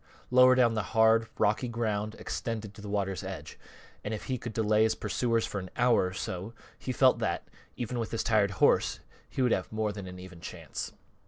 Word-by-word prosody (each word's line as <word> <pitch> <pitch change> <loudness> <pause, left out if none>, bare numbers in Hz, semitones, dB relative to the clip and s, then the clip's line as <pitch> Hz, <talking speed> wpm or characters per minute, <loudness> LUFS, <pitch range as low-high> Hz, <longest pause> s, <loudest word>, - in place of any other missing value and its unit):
Lower 130 0 +7
down 120 -3 +4
the 110 - 0 0.2
hard, 110 0 +5
rocky 110 +4 +2
ground 110 -2 -2
extended 110 -4 -4
to 105 - -12
the 105 - -7
water's 95 -2 -1
edge, - - -7 0.4
and 110 - -2
if - - -7
he 130 -2 -2
could 120 - -5
delay 110 -1 +2
his 110 0 +3
pursuers 115 +2 0
for 100 - -4
an 95 -1 -7
hour 120 -6 +4
or 90 - -6
so, 95 +4 -5 0.2
he 130 - -3
felt 130 0 +4
that, - - -2 0.3
even 120 0 -3
with 115 - -2
his 115 - -2
tired 105 -3 +3
horse, - - +3 0.3
he 130 - -1
would 125 - +3
have - - 0
more 110 -1 -1
than 100 -2 -7
an 90 0 -8
even 90 -2 -11
chance. - - -6
110 Hz, 210 wpm, -29 LUFS, 105-120 Hz, 0.4 s, Lower